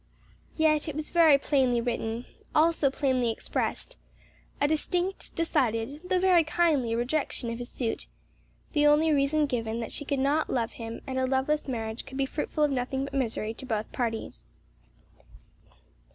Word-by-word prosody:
Yet 310 Hz, -1 st, +2 dB
it 305 Hz, -, -4 dB
was 305 Hz, 0 st, -5 dB
very 325 Hz, -4 st, +6 dB
plainly 265 Hz, -4 st, +2 dB
written; 230 Hz, 0 st, -2 dB, 0.3 s
also 310 Hz, -2 st, +4 dB
plainly 260 Hz, -3 st, +1 dB
expressed; -, -, -3 dB, 0.6 s
a 285 Hz, -, +3 dB
distinct, 355 Hz, +5 st, -1 dB
decided, 260 Hz, -4 st, 0 dB
though 365 Hz, 0 st, +1 dB
very 360 Hz, -2 st, +5 dB
kindly 300 Hz, -8 st, +1 dB
rejection 245 Hz, -1 st, -1 dB
of 230 Hz, -, -5 dB
his 245 Hz, -, -6 dB
suit; 230 Hz, -3 st, -2 dB, 0.7 s
the 295 Hz, -1 st, +4 dB
only 305 Hz, +2 st, +4 dB
reason 295 Hz, +1 st, +2 dB
given 230 Hz, -4 st, -2 dB
that 230 Hz, -, -5 dB
she -, -, -4 dB
could 280 Hz, 0 st, -1 dB
not 285 Hz, +4 st, +1 dB
love 230 Hz, -3 st, 0 dB
him 230 Hz, 0 st, -7 dB
and 260 Hz, -1 st, -2 dB
a 260 Hz, -, +1 dB
loveless 270 Hz, +4 st, 0 dB
marriage 225 Hz, -3 st, -4 dB
could 265 Hz, -, -8 dB
be 275 Hz, -, +1 dB
fruitful 300 Hz, +2 st, -2 dB
of 295 Hz, -, +3 dB
nothing 265 Hz, +1 st, -1 dB
but 275 Hz, -, -6 dB
misery 225 Hz, -4 st, -1 dB
to 260 Hz, -, -9 dB
both 220 Hz, -3 st, -2 dB
parties. 230 Hz, -3 st, -4 dB
275 Hz, 160 wpm, -28 LUFS, 240-305 Hz, 0.7 s, very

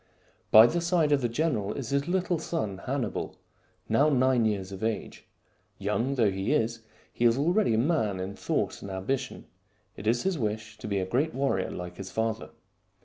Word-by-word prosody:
By 110 Hz, +1 st, +10 dB
the 170 Hz, +8 st, +1 dB
side 170 Hz, -3 st, +2 dB
of 145 Hz, -1 st, +3 dB
the 120 Hz, -, 0 dB
general 120 Hz, -6 st, 0 dB
is 135 Hz, -3 st, -5 dB
his 140 Hz, +2 st, 0 dB
little 180 Hz, -2 st, 0 dB
son 110 Hz, -, -3 dB
Hanni 135 Hz, -1 st, 0 dB
bal, -, -, -4 dB, 0.5 s
now 140 Hz, +7 st, +4 dB
nine 130 Hz, -4 st, +3 dB
years 100 Hz, -3 st, -1 dB
of 95 Hz, +2 st, -7 dB
age. 110 Hz, 0 st, -3 dB, 0.5 s
Young 115 Hz, +7 st, -1 dB
though 110 Hz, -6 st, +3 dB
he 95 Hz, +8 st, -1 dB
is, 115 Hz, -5 st, 0 dB, 0.3 s
he -, -, -2 dB
is 115 Hz, +1 st, +5 dB
already 175 Hz, -, +2 dB
a -, -, +1 dB
man 115 Hz, -, +1 dB
in 95 Hz, +2 st, -4 dB
thought -, -, -2 dB
and 100 Hz, -, -7 dB
ambition. 95 Hz, +8 st, -3 dB, 0.5 s
It 105 Hz, -, -7 dB
is 120 Hz, +2 st, +2 dB
his 190 Hz, -5 st, 0 dB
wish 110 Hz, -1 st, -3 dB
to -, -, -7 dB
be 100 Hz, -1 st, -1 dB
a 95 Hz, -, 0 dB
great 135 Hz, +11 st, 0 dB
warrior 135 Hz, -9 st, 0 dB
like 90 Hz, 0 st, -7 dB
his 95 Hz, -1 st, -7 dB
father. 110 Hz, -1 st, -2 dB
115 Hz, 195 wpm, -28 LUFS, 105-145 Hz, 0.5 s, By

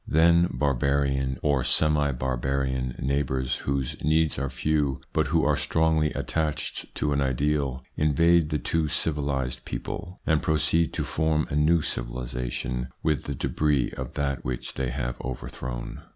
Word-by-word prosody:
Then 85 Hz, +2 st, +5 dB
barbarian, 70 Hz, -1 st, +1 dB
or 70 Hz, -4 st, +2 dB
semi 75 Hz, -2 st, +3 dB
barbarian 65 Hz, 0 st, -1 dB
neighbours, 65 Hz, -1 st, 0 dB
whose 70 Hz, -2 st, -2 dB
needs 80 Hz, 0 st, +2 dB
are 70 Hz, 0 st, -1 dB
few, 70 Hz, +1 st, 0 dB
but -, -, +2 dB
who -, -, +2 dB
are -, -, +3 dB
strongly 80 Hz, -1 st, +2 dB
attached 80 Hz, -2 st, -2 dB
to 75 Hz, -, 0 dB
an 70 Hz, -, +1 dB
ideal, 70 Hz, 0 st, 0 dB
invade 80 Hz, +2 st, +3 dB
the 75 Hz, -, 0 dB
too 80 Hz, +3 st, 0 dB
civilised 70 Hz, -4 st, -1 dB
people, 90 Hz, 0 st, -6 dB
and 80 Hz, -1 st, +2 dB
proceed 80 Hz, +1 st, +2 dB
to -, -, -1 dB
form 80 Hz, -1 st, +1 dB
a -, -, -1 dB
new 75 Hz, +2 st, +4 dB
civilisation 60 Hz, 0 st, -3 dB, 0.2 s
with 75 Hz, -4 st, +1 dB
the 70 Hz, -, -3 dB
debris 75 Hz, -1 st, +1 dB
of 65 Hz, -1 st, -6 dB
that 70 Hz, -4 st, -2 dB
which 60 Hz, -1 st, -4 dB
they 65 Hz, -1 st, -2 dB
have 60 Hz, -1 st, -3 dB
overthrown. -, -, -6 dB
70 Hz, 145 wpm, -26 LUFS, 65-75 Hz, 0.2 s, Then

